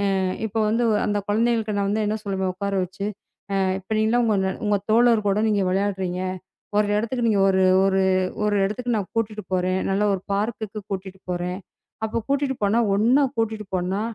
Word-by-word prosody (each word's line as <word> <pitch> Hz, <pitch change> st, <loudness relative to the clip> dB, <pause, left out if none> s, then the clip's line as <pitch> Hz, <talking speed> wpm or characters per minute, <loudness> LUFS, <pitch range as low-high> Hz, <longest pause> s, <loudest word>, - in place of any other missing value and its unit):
அ, -, -, +1 dB, 0.3 s
இப்ப 210 Hz, -, -16 dB
வந்து 230 Hz, +3 st, +1 dB, 0.2 s
அந்த 205 Hz, 0 st, 0 dB
குழந்தைகளுக்கு 225 Hz, 0 st, +1 dB
நான் 200 Hz, 0 st, +1 dB
வந்து 215 Hz, +1 st, 0 dB
என்ன 215 Hz, +1 st, 0 dB
சொல்லுவேன் 190 Hz, -2 st, -1 dB
உட்கார 200 Hz, +1 st, -3 dB
வச்சு, 190 Hz, +2 st, -6 dB, 0.5 s
"அ -, -, +2 dB, 0.2 s
இப்ப 190 Hz, -, -22 dB
நீங்கலாம் 230 Hz, +2 st, +2 dB
உங்க 190 Hz, -3 st, +1 dB
உங்க 205 Hz, 0 st, +2 dB
தோழர்களோட 220 Hz, -3 st, +4 dB
நீங்க 205 Hz, -2 st, +2 dB
விளையாடுறீங்க. 190 Hz, -1 st, -1 dB, 0.6 s
ஒரு 210 Hz, 0 st, +3 dB
இடத்துக்கு 235 Hz, +3 st, -1 dB
நீங்க 205 Hz, -3 st, +3 dB
ஒரு 190 Hz, 0 st, +3 dB, 0.2 s
ஒரு 195 Hz, 0 st, +2 dB, 0.4 s
ஒரு 210 Hz, -1 st, +1 dB
இடத்துக்கு 240 Hz, +3 st, -2 dB
நான் 200 Hz, -3 st, -4 dB
கூட்டிட்டு 215 Hz, -2 st, -2 dB
போறேன். 185 Hz, +1 st, +1 dB
நல்லா 195 Hz, +2 st, +1 dB
ஒரு 190 Hz, -, -3 dB
பார்க்குக்கு 215 Hz, 0 st, -2 dB
கூட்டிட்டு 190 Hz, -1 st, -5 dB
போறேன். 180 Hz, +2 st, -3 dB, 0.5 s
அப்ப 220 Hz, +1 st, -2 dB
கூட்டிட்டு 280 Hz, -1 st, +1 dB
போனா 205 Hz, +4 st, +3 dB, 0.2 s
ஒண்ணா 245 Hz, +7 st, +4 dB
கூட்டிட்டு 220 Hz, -2 st, -1 dB
போனா, 185 Hz, +3 st, -1 dB
205 Hz, 170 wpm, -23 LUFS, 190-220 Hz, 0.6 s, தோழர்களோட